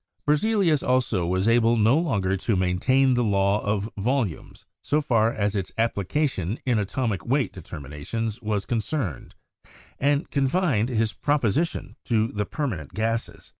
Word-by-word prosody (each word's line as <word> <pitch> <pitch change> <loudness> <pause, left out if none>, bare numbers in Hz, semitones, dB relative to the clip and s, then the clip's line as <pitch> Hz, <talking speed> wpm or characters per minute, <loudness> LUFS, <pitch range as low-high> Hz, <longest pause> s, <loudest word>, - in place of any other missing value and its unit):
Berzelius 160 - +2
also 120 -9 +1
was 95 +3 0
able 115 0 +4
no 110 +4 +4
longer 100 - 0
to 100 +3 -1
maintain 125 +9 +2
the 120 0 +2
law 100 -1 +2
of 100 0 -1
volumes 110 - -2 0.2
so 150 - +1
far 115 -6 +2
as 105 -2 -1
its 95 -3 -2
application 115 - 0
in 120 -4 +2
atomic 105 -1 -2
weight 135 +2 0
de 95 - -9
terminations 80 - -5
was 105 -2 -1
concerned, 115 - -3 0.6
and 145 +3 +1
confined 140 - +1
his 115 -3 0
proposition 145 - 0
to 110 -1 +1
the 105 0 -3
permanent 95 - -4
gases. 115 +2 -2
115 Hz, 140 wpm, -25 LUFS, 100-135 Hz, 0.6 s, able